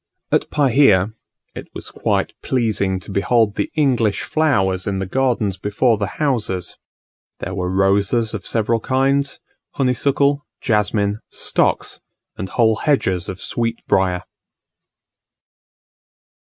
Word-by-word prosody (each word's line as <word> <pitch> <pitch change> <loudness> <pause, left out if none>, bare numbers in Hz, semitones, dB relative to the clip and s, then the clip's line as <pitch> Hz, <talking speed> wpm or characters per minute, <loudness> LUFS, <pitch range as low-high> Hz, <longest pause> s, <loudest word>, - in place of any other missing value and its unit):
At - - +1
Pahia, 125 -8 +4 0.4
it - - -8
was - - -7
quite - - -1
pleasing 105 -6 0
to 95 - -10
behold 105 +2 +2
the - - -2
English 120 -9 +2
flowers 95 -12 +1
in 100 -1 -1
the 95 - -2
gardens 115 -3 0
before 105 +3 +1
the 100 - -1
houses; 115 -11 -1 0.6
there 95 - -5
were 90 -1 -2
roses 100 +4 +2
of 110 - -4
several 115 0 +1
kinds, 135 +3 0 0.3
honeysuckle, 140 +2 +1 0.2
jasmine, 105 -2 0
stocks, - - 0 0.3
and 95 - -5
whole 110 -1 +2
hedges 95 - 0
of 95 - -6
sweetbrier. 95 -6 -1
110 Hz, 115 wpm, -20 LUFS, 95-130 Hz, 0.6 s, Pahia